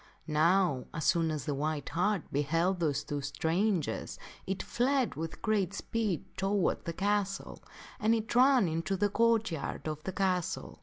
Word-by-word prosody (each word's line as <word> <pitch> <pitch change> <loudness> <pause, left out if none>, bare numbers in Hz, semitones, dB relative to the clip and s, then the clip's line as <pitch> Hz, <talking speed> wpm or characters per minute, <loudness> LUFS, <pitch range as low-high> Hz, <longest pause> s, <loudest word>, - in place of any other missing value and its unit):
Now, 160 -3 +2
as 160 - -2
soon 165 -2 +3
as 150 -5 -3
the 145 - -1
white 150 +1 -2
hart 185 +1 +1
beheld 165 +6 +1
those 145 -4 0
two 145 -1 -3
strangers, 160 +5 -1 0.3
it 190 0 -2
fled 260 +1 +1
with 160 +1 -6
great 205 -4 +1
speed 215 -5 -2
toward 195 -1 0
the 170 - -2
castle, 200 +1 -1 0.4
and 220 +2 +3
it 225 0 -3
ran 255 -4 +6
into 165 +4 -1
the 205 +2 +2
court 225 -1 +2
yard 160 0 -4
of 155 -1 -4
the 190 - -3
castle. 185 -1 -1
185 Hz, 160 wpm, -31 LUFS, 155-205 Hz, 0.4 s, ran